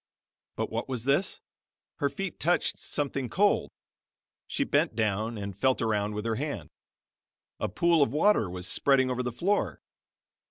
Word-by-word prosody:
But - - -3
what - - -3
was 125 -4 -2
this? 140 +8 +1 0.6
Her 140 - +1
feet 195 +3 -5
touched 175 +3 +1
something 140 -3 -2
cold! 205 - +2 0.8
She - - 0
bent - - +1
down 110 +1 0
and 100 -2 -5
felt 130 -1 +2
around 105 -2 0
with 105 +1 -4
her 115 -1 0
hand. 145 +2 -4 0.9
A - - -1
pool 170 -2 +3
of 140 - +3
water 150 - +3
was 90 0 -5
spreading 130 +4 +3
over 125 0 -1
the 125 -1 -2
floor. 190 - 0
130 Hz, 155 wpm, -28 LUFS, 110-150 Hz, 0.9 s, pool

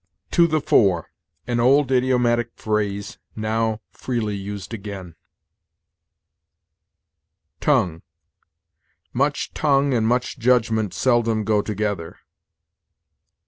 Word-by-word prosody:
TO 170 -2 +5
THE 155 -2 0
FORE. 95 -10 +2 0.3
An 120 -1 -1
old 135 +3 +4
idiomatic 125 -2 +2
phrase, 100 -2 -2 0.2
now 110 0 -1
freely 115 -5 -3
used 100 +2 -6
again. 100 -5 -7 2.5
TONGUE. 85 -2 +1 1.1
"Much 145 +3 0
tongue 140 -2 +2
and 110 -2 +1
much 125 +3 0
judgment 115 -5 +2
seldom 115 -3 +2
go 105 0 +2
together." 100 -5 -3
110 Hz, 90 wpm, -22 LUFS, 105-125 Hz, 2.5 s, TO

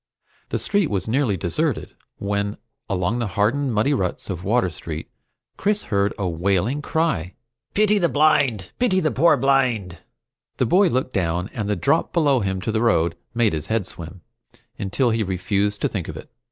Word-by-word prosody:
The - - -1
street 200 -5 +1
was 100 -2 -2
nearly 115 -4 +1
deserted - - -1 0.2
when 100 +1 -2 0.3
along 100 +4 0
the 115 - -1
hardened 130 +7 +2
muddy 115 +6 +2
ruts 95 -4 -2
of 90 -1 -5
Water 100 -2 +1
Street 80 0 -7 0.5
Chris 210 +1 0
heard 100 0 +2
a 95 - -1
wailing 100 - 0
cry: 150 - -1 0.4
"Pity 210 0 +4
the 170 -3 +2
blind! 140 -10 +2
Pity 225 -7 +3
the 155 -5 +1
pore 170 +6 +4
blind!" 120 -10 +1 0.6
The 130 - +2
boy 185 - +4
looked 130 -4 -1
down, 90 0 -1
and 105 -2 -3
the 105 - +1
drop 95 - +1
below 145 -6 +3
him 95 -3 -1
to 110 - -2
the 110 0 0
road 85 -8 +2 0.2
made 115 -5 +2
his 75 -2 -3
head 110 -3 0
swim, 85 +1 -9 0.6
until 115 +5 +1
he 115 0 0
refused 100 +2 -1
to - - +2
think 95 -6 -4
of - - -6
it. 150 - -11
105 Hz, 180 wpm, -22 LUFS, 95-140 Hz, 0.6 s, Pity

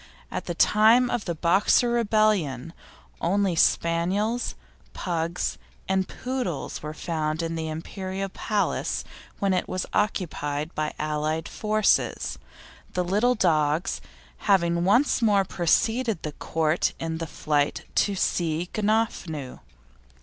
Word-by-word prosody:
At - - -4
the 175 - -3
time 225 +7 +5
of 240 - -1
the 170 - -2
Boxer 190 +8 +3
Rebellion 210 - +1 0.5
only 195 +1 +1
Spaniels, 185 +9 +1 0.4
Pugs, 170 -1 -2 0.3
and 190 0 +1
Poodles 250 - -4
were 150 0 -6
found 160 -1 -2
in 165 0 -2
the 160 -1 -3
Imperial 190 +4 -4
Palace 210 +2 -1 0.3
when 195 -1 +1
it 180 - -1
was 185 0 -2
occupied 155 -7 -1
by 155 0 -1
the - - -3
Allied 155 +1 -1
Forces, 215 -1 +1 0.5
the 180 - 0
little 210 +8 +2
dogs 155 -2 +1 0.5
having 170 -3 +3
once 245 +8 +3
more 205 -4 +4
preceded 220 +5 +1
the 150 - -3
court 160 +2 0
in 165 0 -3
the 165 - -3
flight 145 -2 0
to 200 - +2
Si 170 -2 0
gnanfu. 205 - -1
180 Hz, 120 wpm, -26 LUFS, 160-210 Hz, 0.5 s, time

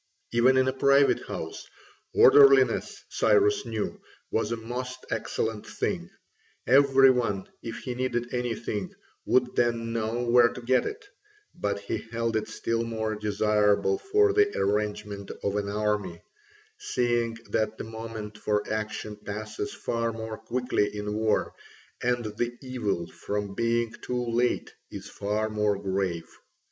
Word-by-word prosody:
Even 125 +3 +5
in 130 0 +4
a 130 - +1
private 140 +1 +3
house, - - -6 0.5
orderliness, 415 -2 +6
Cyrus 415 -3 +3
knew, - - -3 0.3
was 110 0 0
a 115 - -1
most 125 +3 -6
excellent 110 -1 -2
thing: - - -3 0.6
every 135 +1 +6
one, 115 -7 -1
if 115 - -6
he 125 - -4
needed 120 -1 -2
anything, 115 -5 -3 0.3
would 125 -1 +2
then 115 -1 +1
know 115 +1 -1
where 120 0 +5
to 125 - -8
get 130 +2 +2
it; 425 0 -7 0.5
but 100 0 -2
he 100 - -3
held 115 0 -3
it 110 0 0
still 115 +1 -2
more 110 -1 -2
desirable 105 - +2
for 415 0 +3
the 415 0 +4
arrangement 105 0 -1
of 100 0 0
an 100 -1 -1
army, 105 -4 -1 0.6
seeing 120 - 0
that 110 0 0
the - - -5
moment 110 -1 -7
for 105 -1 0
action 110 0 -4
passes 105 0 -5
far 115 0 -2
more 110 0 -5
quickly 115 -4 -1
in 105 0 -3
war 110 0 +1 0.5
and 120 -1 0
the 120 +3 -3
evil 110 -9 -2
from 100 +3 -4
being 115 +1 0
too 125 -1 -2
late 120 +1 0 0.2
is - - -8
far 105 +2 -2
more 105 -1 +1
grave. 95 -4 -2
115 Hz, 140 wpm, -27 LUFS, 105-125 Hz, 0.6 s, orderliness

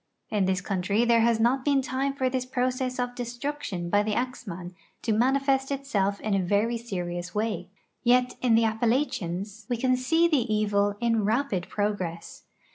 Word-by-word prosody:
In 205 -3 +2
this 185 -1 0
countiy 200 +4 0
there 235 -1 +5
has 230 0 +3
not 250 +3 +2
been 280 -1 +3
time 270 +2 -1
for 260 -2 0
this 255 0 -1
l)rocess 255 0 -1
of 245 0 -1
destruction 245 -6 -4
by 205 +4 +3
the 210 0 -1
axman 195 -8 -4 0.3
to 225 - 0
manifest 270 +3 +2
itself 205 -8 -1
in 215 - -1
a 195 - +3
veiy 205 +6 +1
serious 180 -5 -5
way, 210 -4 -2 0.3
yet 250 +1 +3
in 240 -3 +4
the 225 0 +4
Appalachians 220 - -1
we 245 - 0
can 255 +1 +2
see 325 +7 +3
the 255 -9 +1
evil 205 -1 +1
in 230 -2 +2
rapid 215 -4 0
])rogress. 185 -5 -2
230 Hz, 170 wpm, -27 LUFS, 200-255 Hz, 0.3 s, there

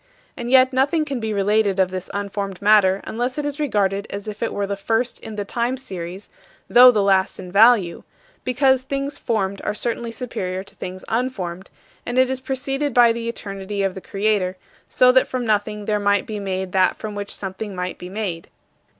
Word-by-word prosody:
And 240 -1 -5
yet 260 0 +5
nothing 285 +5 +2
can 275 -4 -3
be 220 -1 -3
related 205 0 +2
of 185 -1 +3
this 185 -1 -5
unformed 200 -1 -4
matter 200 -2 +4
unless 245 +4 -3
it 295 - -2
is 290 +1 -3
regarded 200 -8 0
as 200 +1 -6
if 210 0 -7
it 230 - -1
were 205 - -2
the 200 0 -3
first 225 +5 -1
in 220 - -8
the 205 -1 -3
time 240 +5 -1
series 185 -6 -7 0.4
though 250 +1 +9
the 215 -5 +3
last 190 -1 +2
in 180 - -8
value 200 -4 +5 0.4
because 265 +1 +3
things 275 +2 -3
formed 200 -4 -1
are 210 - -2
certainly 235 +1 -2
superior 190 -7 -4
to - - -15
things 185 +1 -8
unformed 195 -7 -3 0.3
and 245 - -4
it 260 0 +4
is 260 0 -3
preceded 270 +1 -2
by 240 -1 +7
the 230 0 -3
eternity 200 -2 -4
of 195 -1 0
the 190 - -8
Creator, 195 -2 0 0.3
so 250 0 +5
that 260 0 +4
from 255 -2 -3
nothing 210 -1 -1
there 210 0 0
might 205 0 +2
be 215 -1 -5
made 190 -1 -3
that 185 -1 +3
from 215 -1 -6
which 205 0 -5
something 195 +1 -5
might 180 0 -4
be 180 - -8
made. 190 -5 -4
210 Hz, 200 wpm, -21 LUFS, 195-245 Hz, 0.4 s, though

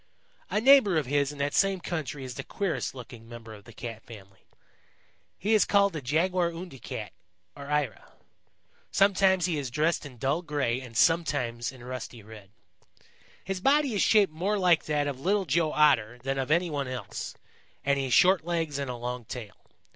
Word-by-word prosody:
"A 210 - +1
neighbor 235 -7 +6
of 155 - 0
his 140 +1 +1
in 145 - -11
that 140 +1 -1
same 195 -1 +2
country 150 -5 -4
is 130 -1 -6
the - - -6
queerest 195 -8 -3
looking 115 -2 -11
member 115 -2 -10
of 105 -2 -14
the 115 - -12
Cat 115 0 -8
family. 100 -4 -14 0.9
He 215 +3 0
is 215 - +5
called 200 -1 +3
the 155 - -4
Jaguarundi 170 +2 -1
Cat 105 -1 -6 0.4
or 140 - -9
Eyra. 145 -7 -2 0.8
Sometimes 190 -2 +3
he 165 -5 -1
is 135 -3 -4
dressed 155 +6 0
in 135 -4 -10
dull 140 +7 0
gray 145 -7 -1
and 120 -3 -8
sometimes 125 -8 +1
in 130 -2 -14
rusty 125 -2 -7
red. 105 -2 -13 0.9
His 195 -1 -4
body 280 +1 +3
is 205 - +1
shaped 205 -7 +4
more 195 +6 -1
like 180 -4 +3
that 150 -1 0
of 140 -3 -4
Little 195 +5 +1
Joe 155 +1 +1
Otter 125 -7 +3
than 135 0 -1
of 130 0 -2
any 170 +2 +2
one 140 -2 -2
else, 130 0 -6 0.5
and 140 0 +2
he 135 - -1
has 130 - -1
short 180 -3 +5
legs 165 -4 -2
and 140 -2 -3
a 125 - -3
long 120 +1 -5
tail. 110 -4 -8
145 Hz, 185 wpm, -28 LUFS, 125-180 Hz, 0.9 s, neighbor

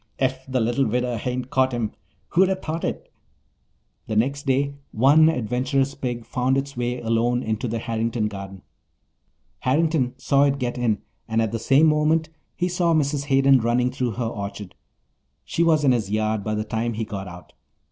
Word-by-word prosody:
"Ef 130 0 -1
the 130 -1 0
little 120 +3 +1
widder 125 +2 -1
hain't 125 +3 -4
caught 130 0 +2
him! 115 -3 -1 0.4
Who'd 185 +2 +4
a 190 - +1
thought 165 -3 -5
it?" - - -4 1.0
The 110 - -3
next 140 +6 0
day 140 +1 +1 0.2
one 145 +7 +5
adventurous 135 +1 0
pig 120 -4 -4
found 130 +1 0
its 140 +1 -3
way 120 0 -2
alone 120 +1 +1
into 110 +2 -2
the 115 +1 -2
Harrington 115 0 -1
garden. 95 -2 -8 1.0
Harrington 140 -2 +1
saw 140 +1 +3
it 140 0 +1
get 125 -3 -2
in 110 -4 0 0.2
and 115 0 0
at 110 -2 +1
the 115 - -2
same 135 +7 +4
moment 155 +1 +2 0.3
he 180 - 0
saw 175 -2 +1
Mrs. 140 -2 0
Hayden 135 -1 +4
running 120 +2 +1
through 125 -3 -2
her 120 +2 -3
orchard. 100 -3 -5 0.7
She - - -2
was 160 -3 +3
in 135 - +5
his 115 -6 0
yard 110 0 0
by 110 +1 -2
the 105 - -1
time 110 +2 -2
he 110 +1 -3
got 100 -3 -6
out. 90 0 -12
125 Hz, 180 wpm, -23 LUFS, 110-140 Hz, 1.0 s, one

